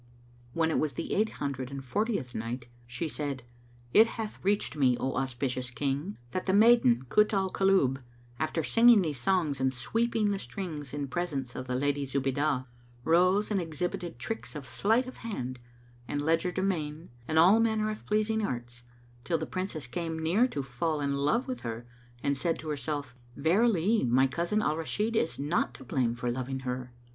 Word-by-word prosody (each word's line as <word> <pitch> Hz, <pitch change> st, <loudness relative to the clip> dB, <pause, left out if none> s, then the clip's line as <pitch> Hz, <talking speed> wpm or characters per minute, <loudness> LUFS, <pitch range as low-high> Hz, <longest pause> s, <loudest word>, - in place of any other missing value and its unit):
When 160 Hz, -1 st, +1 dB
it -, -, +1 dB
was 155 Hz, -3 st, 0 dB
the -, -, -4 dB
Eight 215 Hz, +2 st, +1 dB
Hundred 130 Hz, -3 st, -3 dB
and 135 Hz, -1 st, -7 dB
Fortieth 200 Hz, -, -1 dB
Night, 120 Hz, +3 st, -4 dB, 0.2 s
She 120 Hz, +7 st, -3 dB
said, 140 Hz, -4 st, -4 dB, 0.5 s
It 220 Hz, +2 st, +8 dB
hath 220 Hz, -2 st, -5 dB
reached 200 Hz, -4 st, +1 dB
me, 130 Hz, -4 st, +3 dB
O 130 Hz, -, -1 dB
auspicious 130 Hz, -1 st, -2 dB
King, 140 Hz, -, -2 dB
that 185 Hz, -, -3 dB
the 190 Hz, -, +3 dB
maiden, 205 Hz, -, +5 dB
Kut 210 Hz, -, +4 dB
al 190 Hz, -1 st, +1 dB
Kulub, 185 Hz, -9 st, +3 dB, 0.4 s
after 155 Hz, +1 st, -1 dB
singing 230 Hz, +2 st, +6 dB
these 150 Hz, -6 st, -3 dB
songs 150 Hz, -1 st, +1 dB
and 130 Hz, 0 st, +3 dB
sweeping 225 Hz, -, 0 dB
the 200 Hz, -, -1 dB
strings 150 Hz, -2 st, -6 dB
in 145 Hz, -1 st, -3 dB
presence 140 Hz, -5 st, -3 dB
of 130 Hz, -, -5 dB
the 125 Hz, -, -1 dB
Lady 145 Hz, +2 st, 0 dB
Zubaydah, 135 Hz, 0 st, 0 dB, 0.4 s
rose 185 Hz, -, +3 dB
and 200 Hz, -3 st, +2 dB
exhibited 170 Hz, 0 st, -4 dB
tricks 195 Hz, -, -5 dB
of 140 Hz, -3 st, -7 dB
sleight 220 Hz, -, +2 dB
of 255 Hz, -, -9 dB
hand 130 Hz, -, -5 dB, 0.5 s
and 145 Hz, -, -2 dB
legerdemain 165 Hz, -1 st, 0 dB, 0.2 s
and 160 Hz, -, 0 dB
all 185 Hz, +7 st, +7 dB
manner 220 Hz, -1 st, +1 dB
pleasing 215 Hz, +1 st, 0 dB
arts, 120 Hz, -7 st, -4 dB, 0.4 s
till 165 Hz, +5 st, 0 dB
the -, -, -3 dB
Princess 185 Hz, -6 st, -4 dB
came 160 Hz, +6 st, -4 dB
near 175 Hz, +10 st, +3 dB
to 145 Hz, -, -4 dB
fall 150 Hz, +5 st, -2 dB
in 140 Hz, -1 st, 0 dB
love 150 Hz, -, +1 dB
with 255 Hz, -1 st, -4 dB
her 115 Hz, 0 st, -5 dB, 0.4 s
and 140 Hz, 0 st, +1 dB
said 165 Hz, +4 st, 0 dB
to 155 Hz, -, -7 dB
herself, 145 Hz, -1 st, -3 dB, 0.2 s
"Verily, 200 Hz, +6 st, +3 dB
my 130 Hz, +2 st, +4 dB
cousin 170 Hz, +10 st, 0 dB
Al 155 Hz, +1 st, +1 dB
Rashid 210 Hz, +7 st, -1 dB
is 165 Hz, -, +1 dB
not 145 Hz, -4 st, 0 dB
to 130 Hz, -, -11 dB
blame 120 Hz, -2 st, 0 dB
for 120 Hz, 0 st, -2 dB
loving 130 Hz, +2 st, -3 dB
her!" 125 Hz, -1 st, -4 dB
155 Hz, 175 wpm, -29 LUFS, 130-195 Hz, 0.5 s, It